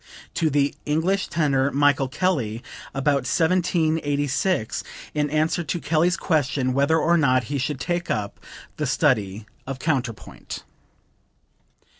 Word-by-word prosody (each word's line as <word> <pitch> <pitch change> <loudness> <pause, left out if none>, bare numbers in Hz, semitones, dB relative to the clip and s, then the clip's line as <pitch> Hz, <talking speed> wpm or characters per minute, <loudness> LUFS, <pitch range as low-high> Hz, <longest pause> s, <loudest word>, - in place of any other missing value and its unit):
'" - - -23
(To 160 - +3
the 145 -1 +2
English 170 +6 0
tenor 140 -4 +1
Michael 145 -1 +3
Kelly, 130 - -1 0.3
about 135 -1 0
1786, 160 - +1 0.3
in 150 -1 0
answer 155 +3 +1
to 170 +3 -2
Kelly's 165 +2 +2
question 140 -5 0
whether 140 +4 +3
or 170 +2 +3
not 130 -5 +3
he 140 - 0
should 130 +1 -2
take 175 +4 -2
up 105 -2 -2 0.4
the - - -1
study 105 +1 +1 0.2
of 135 -1 -4
counterpoint.) 130 -7 -3
145 Hz, 125 wpm, -24 LUFS, 130-165 Hz, 0.4 s, To